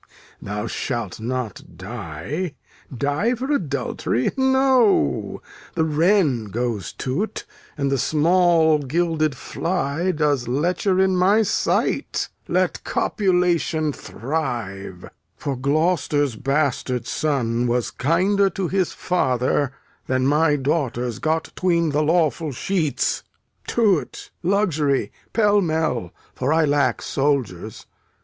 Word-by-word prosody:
Thou 105 +2 -4
shalt 115 -3 -3
not 115 -7 -5
die. 105 - -5 0.4
Die 145 - 0
for 260 +4 -3
adultery? 140 - -1
No. 265 - +2 0.3
The 160 - +2
wren 160 - +2
goes 110 -1 -3
to't, 155 +12 -3 0.3
and 140 -1 0
the 135 - +1
small 160 +1 +3
gilded 155 0 0
fly 170 -1 -2
Does 150 -6 0
lecher 175 +8 +1
in 190 0 +3
my 195 +5 +4
sight. - - 0 0.2
Let - - 0
copulation 175 -6 +1
thrive; 115 - -4 0.3
for 140 - -3
Gloucester's 145 -1 +1
bastard 135 -2 -1
son 125 -5 0
Was 120 0 0
kinder 190 +8 +2
to 185 -1 -3
his 190 -1 0
father 130 -5 0 0.4
than 130 0 +1
my 150 +2 +3
daughters 130 -5 -1
Got 160 +1 -1
'tween 170 -3 +1
the 145 +1 +1
lawful 155 -1 +1
sheets. 160 +2 -1 0.5
To't, 205 -8 0
luxury, 170 -7 +1 0.2
pell 210 -2 +3
mell! 160 - -1 0.2
for 130 +3 -1
I 160 0 +4
lack 145 -1 +1
soldiers. 120 -9 -1
150 Hz, 105 wpm, -22 LUFS, 125-180 Hz, 0.5 s, my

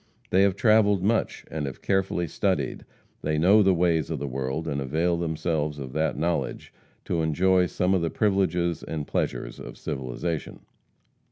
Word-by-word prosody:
They 95 - +4
have 100 -2 +3
travelled 105 -4 +4
much, 110 +3 0
and 75 -3 -3
have 65 - -8
carefully 95 -3 +1
studied; 90 -5 -1 0.4
they 75 0 0
know 95 +7 +6
the 95 -2 +4
ways 85 -3 +1
of - - -2
the - - -4
world, 65 +4 -3
and 70 -2 -2
avail 80 +6 +1
themselves 80 -2 -1
of 65 -3 -7
that 80 -3 0
knowledge 85 +1 -2 0.3
to 85 - 0
enjoy 90 +4 +3
some 90 +2 0
of 95 - +2
the 85 - 0
privileges 90 -5 +1
and 75 -2 -4
pleasures - - -3
of - - -9
civilization. 75 +3 -4
85 Hz, 165 wpm, -26 LUFS, 75-95 Hz, 0.4 s, know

